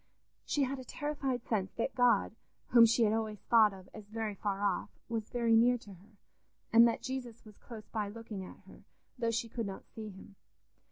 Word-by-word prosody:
She 290 - +1
had 270 +1 -2
a - - -7
terrified 270 -3 -3
sense 195 -4 -1
that 235 +3 -2
God, 245 -3 +3 0.3
whom 235 -1 +8
she 230 +1 +3
had 215 -1 +3
always 220 -1 -2
thought 220 0 +4
of 190 -1 -12
as 215 -2 -10
very 220 0 -3
far 200 0 -3
off, 200 -3 0 0.2
was 225 -2 -3
very 235 -2 +2
near 245 +2 +5
to 205 -4 -13
her, 200 +3 -19 0.6
and 230 +1 +8
that 230 - -2
Jesus 250 -4 -5
was 210 -1 -15
close 220 -3 -10
by 210 -2 -3
looking 215 -2 -7
at - - -12
her, - - -15 0.4
though 230 -2 +1
she 230 0 -1
could 230 -1 -4
not 195 - -7
see 220 -1 -8
him. 195 0 -13
225 Hz, 205 wpm, -32 LUFS, 210-235 Hz, 0.6 s, whom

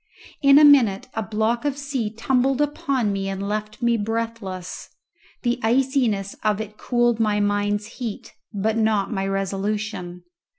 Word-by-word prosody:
In 275 0 +7
a 300 - +8
minute 245 -8 +5
a 225 - -2
block 220 +3 -1
of 285 -2 -1
sea 275 -6 -2
tumbled 260 +4 +1
upon 280 -7 0
me 195 0 -2
and 195 +1 -4
left 215 +2 -4
me 235 -1 +3
breathless; 220 -4 -4 0.5
the 245 0 0
iciness 235 -5 +1
of 210 -1 +1
it 215 -1 -6
cooled 240 0 +1
my 210 -2 +2
mind's 205 0 0
heat, 230 0 -7 0.2
but 215 +1 -1
not 215 -2 +1
my 195 -1 -1
resolution. 195 -2 -3
220 Hz, 145 wpm, -23 LUFS, 205-245 Hz, 0.5 s, a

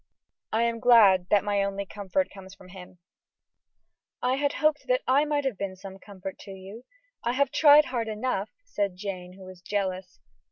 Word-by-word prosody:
I 225 +2 +1
am 235 0 -1
glad 205 -7 +5
that 205 - +3
my 205 -1 0
only 200 0 -3
comfort 205 +8 -2
comes 190 -1 -12
from 185 -2 -16
him." 180 -1 -12 1.3
"I 255 +1 +2
hoped 295 +1 0
that - - +2
I 275 +3 +3
might 295 -1 -1
have 250 -8 -2
been 195 -1 -4
some 190 +1 -11
comfort 195 -1 -9
to 200 - -11
you; 195 +6 -11 0.4
I 240 - 0
have 275 0 +1
tried 295 0 +6
hard 235 -3 -3
enough," 215 -1 -2 0.2
said 200 - -2
Jane, 180 -2 -7
who 190 0 -14
was 185 -1 -12
jealous. 190 -2 -4
205 Hz, 175 wpm, -26 LUFS, 190-255 Hz, 1.3 s, tried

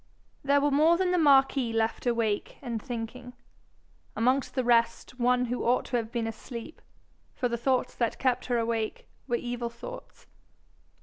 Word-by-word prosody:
There 280 +1 +4
were 290 +1 +1
more 315 +4 +5
than 365 0 +1
the 360 - +2
marquis 270 -4 +4
left 225 +2 -1
awake 230 -3 0
and 235 -4 -3
thinking; 245 0 -6 0.8
amongst 255 +4 +1
the 255 - +1
rest 235 +1 +1
one 250 +1 +3
who 245 +1 -3
ought 245 +2 +2
to 245 - -1
have 225 -1 -4
been 235 -2 -1
asleep, 230 +5 -7 0.5
for 250 - 0
the 235 - -2
thoughts 255 +2 0
that 235 -2 -1
kept 255 -2 0
her 245 -1 +1
awake 230 -1 -2 0.2
were 240 - +1
evil 240 0 -3
thoughts. 370 - -10
245 Hz, 165 wpm, -28 LUFS, 230-270 Hz, 0.8 s, more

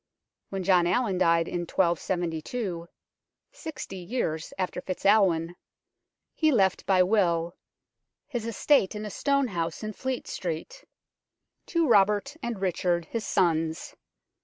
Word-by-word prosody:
When 195 -1 -3
John 180 -2 +4
Allin 190 0 +1
died 165 -2 +3
in 175 - -3
1272 175 +2 -1 0.6
sixty 320 - -7
years 175 -5 -3
after 185 -1 -2
FitzAlwin 185 -3 +2 0.8
he 315 -1 +2
left 195 -7 +2
by 185 -2 +5
will 175 -4 +1 0.4
" - - -59
his 230 -1 -2
estate 230 -2 +2
in 210 0 -5
a 210 - -5
stone 280 +1 +1
house 170 0 -3
in 215 0 -4
Fletestrete 190 -10 -5 0.4
" - - -56
to 335 -2 +1
Robert 210 +4 +3
and 235 -4 -4
Richard, 175 -2 0
his 230 -2 -3
sons. 165 -4 0
190 Hz, 125 wpm, -27 LUFS, 170-220 Hz, 0.8 s, by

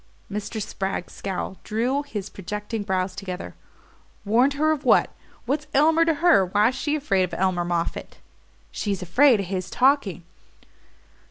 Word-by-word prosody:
Mr. 210 +2 -4
Spragg's 195 -3 -4
scowl 190 0 -4
drew 245 +6 0
his 210 -9 -6
projecting 210 +4 -5
brows 190 -2 -1
together. 185 -2 -6 0.7
"Warned 245 +7 +3
her 310 +2 +2
of 300 -2 -2
what? 255 - +4 0.3
What's 290 +4 -2
Elmer 320 +4 +4
to 325 -1 +2
her? 335 - +5
Why's 205 +6 +2
she 295 +3 -1
afraid 235 -11 +1
of 180 - -1
Elmer 185 -1 +1
Moffatt?" 170 -1 -3 0.5
"She's 200 -3 -3
afraid 245 - +4
of - - -4
his 185 0 -4
talking." 255 -9 +2
210 Hz, 145 wpm, -24 LUFS, 190-280 Hz, 0.7 s, her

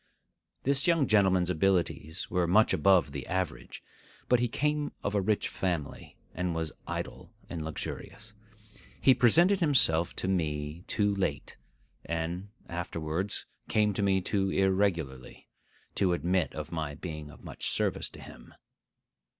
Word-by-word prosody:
This 140 +4 +2
young 165 -4 +4
gentleman's 95 -5 +3
abilities 85 -2 0
were 90 -1 0
much 105 +6 +4
above 95 -3 +4
the - - -6
average; 95 -4 -3 0.4
but 125 - +4
he 120 - +2
came 150 +4 -1
of 100 - -1
a 100 - +2
rich 105 +2 +1
family, 85 -6 -4 0.2
and 90 -2 -2
was 80 -2 -2 0.2
idle - - -5 0.2
and 85 -2 -4
luxurious. 105 +7 -6 0.7
He 130 - +6
presented 170 - +5
himself 105 - +3
to - - -3
me 80 -3 -2
too 105 -2 +1
late, 85 -8 -2 0.5
and 85 +4 -3 0.2
afterwards 85 +2 -3 0.2
came 105 -1 +2
to 100 - -2
me 95 -1 +2
too 95 +1 0
irregularly, 95 -10 0 0.5
to 95 -3 +2
admit 90 0 0
of 75 -1 -6
my 80 -3 -3
being 75 -2 -7
of - - -15
much - - -3
service - - 0
to - - -13
him. - - -13
95 Hz, 140 wpm, -29 LUFS, 80-105 Hz, 0.7 s, He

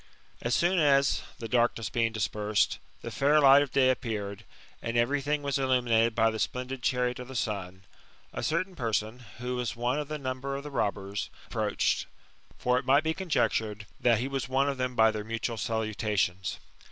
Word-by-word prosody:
As 120 +1 +1
soon 175 +1 +3
as, 140 -2 +4 0.2
the 115 - -6
darkness 120 -2 +1
being 115 -1 +1
dispersed, 105 -1 0 0.2
the - - -5
fair 145 +2 +3
light 140 -1 +8
of 145 - -1
day 130 -1 +4
appeared, 105 -4 -4 0.4
and 115 0 -2
every 135 +5 +2
thing 145 +1 -1
was 140 -1 0
illuminated 120 -4 +2
by 115 0 +3
the 110 - -5
splendid 125 +2 -3
chariot 125 0 0
of 125 - -7
the 130 - -9
sun, 95 -5 -3 0.5
a - - -4
certain 180 +4 -1
person, 115 -3 -1 0.2
who 125 +1 -3
was 125 -2 -2
one 120 +4 0
of 150 - -4
the 155 +1 -4
numbear 135 0 -3
of 140 - -7
the 150 - -7
robbers, 100 -5 -2 0.2
approached; - - 0 0.5
for 125 0 +2
it 130 - -9
might 140 +3 +5
be 160 0 0
conjectured 110 - 0
that 120 -2 +4
he 125 +5 -2
was 135 -2 -3
one 135 +2 +2
of 140 -2 -2
them 125 -1 -1
by 110 -1 +5
their 105 -1 -4
mutual 115 +2 -3
salutations. 105 -4 -1
125 Hz, 190 wpm, -29 LUFS, 110-135 Hz, 0.5 s, light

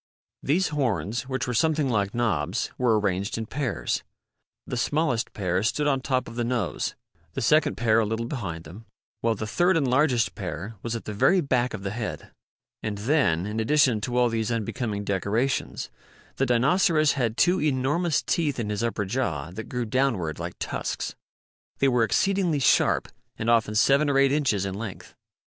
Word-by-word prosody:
These 170 +6 +1
horns, 130 -3 -1
which 130 0 -1
were 125 - -2
something 155 +2 +2
like 105 -4 0
knobs, 100 -5 0
were 115 -4 +2
arranged 100 0 -1
in 115 - -3
pairs. 135 +2 -2 0.6
The - - -4
smallest 125 -1 0
pair 90 -2 0
stood 135 +7 0
on 135 -2 +1
top 130 -1 -1
of 115 - -8
the 120 - -1
nose, 120 -5 -2 0.4
the - - -3
second 155 +6 +3
pair 115 -1 +3
a 110 - +2
little 110 +2 -2
behind 95 - -5
them, 100 +9 -12 0.3
while 115 -1 +1
the 110 - -4
third 175 +10 +2
and 140 -4 +1
largest 125 -3 +2
pair 95 +8 -5
was 115 0 -3
at 115 - -6
the 105 - -4
very 180 - +4
back 125 -6 0
of 95 - -8
the 100 - -3
head. 110 0 -5 0.5
And 105 -1 -3
then, 105 - +1
in 105 +2 -3
addition 125 -2 +3
to 125 +2 -2
all 125 -1 +4
these 115 -1 -1
unbecoming 110 -2 -2
decorations, 100 - -1 0.5
the - - +1
Dinoceras 155 +5 +3
had 120 -4 -1
two 180 +1 +3
enormous 150 +4 +1
teeth 150 -6 0
in 105 -2 -2
his 105 - -2
upper 115 -3 -1
jaw 85 - -2
that 110 +5 -7
grew 125 -1 -2
downward 110 - 0
like - - -5
tusks. - - -3 0.6
They 135 - +3
were 125 -3 +3
exceedingly 180 - +1
sharp 135 - +3 0.3
and 115 +1 +1
often 110 -2 +2
seven 140 +6 +4
or 140 - +2
eight 135 0 +4
inches 130 -10 +1
in 95 - -3
length. 100 -1 -7
120 Hz, 180 wpm, -26 LUFS, 105-140 Hz, 0.6 s, very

